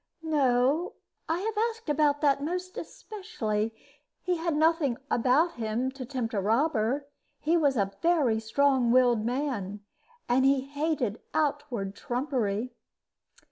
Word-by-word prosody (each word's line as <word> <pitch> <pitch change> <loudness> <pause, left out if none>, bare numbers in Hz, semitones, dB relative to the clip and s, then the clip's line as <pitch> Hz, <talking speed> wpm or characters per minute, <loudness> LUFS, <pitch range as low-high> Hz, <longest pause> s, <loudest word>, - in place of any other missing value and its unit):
"No. 285 +1 +2 0.4
I 335 +3 0
have 445 +2 -2 0.2
asked 455 -4 -11
about 295 -1 +2
that 280 -2 +3
most 360 +4 -3
especially. 225 - -4 0.5
He 360 -1 0
had 330 -1 -1
nothing 310 -5 +2
about 270 +8 +3
him 235 +3 -1
to 260 -2 -8
tempt 250 -3 -3
a 200 - 0
robber. 245 +4 +1 0.3
He 320 +3 +1
was 285 -6 +2
a 195 -1 0
very 300 -10 +3
strong 255 +2 +2
willed 245 -3 +4
man, 230 -6 -2 0.5
and 250 +2 +3
he 270 0 +4
hated 280 -5 -2
outward 280 -10 -1
trumpery." 245 -2 -2
270 Hz, 130 wpm, -28 LUFS, 235-310 Hz, 0.5 s, willed